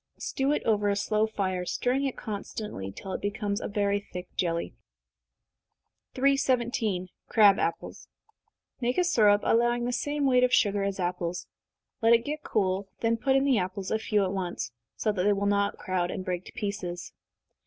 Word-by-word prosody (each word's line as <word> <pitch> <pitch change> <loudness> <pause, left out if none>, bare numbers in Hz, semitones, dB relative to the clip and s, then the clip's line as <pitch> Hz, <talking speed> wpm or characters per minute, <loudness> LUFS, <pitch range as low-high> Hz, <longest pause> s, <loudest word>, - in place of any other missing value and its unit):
Stew 270 +1 -1
it 295 - 0
over 210 -2 +2
a 200 - +2
slow 215 +1 +1
fire, 185 -4 -2
stirring 255 +9 0
it 270 - -3
constantly, 205 - -5
till 190 - -7
it - - -4
becomes 205 0 -2
very 205 -1 0
thick 180 -3 -8
jelly. 170 -2 -1 1.4
317. 240 -8 +1 0.2
Crab 205 -3 +6
Apples. 165 - -3 0.7
Make 245 0 0
a 360 - +4
syrup, 210 -12 +4
allowing 240 +1 +2
the 245 - -1
same 290 +3 -1
weight 250 -2 +4
of 250 - +3
sugar 205 -5 +3
as 195 0 -2
apples. 175 -1 -2 0.6
Let 225 +1 +6
it 230 0 +3
get 300 +1 -3
cool, 195 -4 0
then 230 0 +2
put 265 +4 +1
in 270 - +4
the 265 -6 +3
apples, 185 +1 -4
a 220 - +1
few 210 -2 +1
at 190 0 -1
once, 180 -10 -3 0.2
so 215 - 0
that 195 -3 -2
they 205 +2 +4
will 200 0 -1
not 200 0 +1
crowd, 185 -2 -1
and 185 - -5
break 180 -1 -3
to - - -10
pieces. 190 -4 -4
205 Hz, 175 wpm, -28 LUFS, 185-240 Hz, 1.4 s, Crab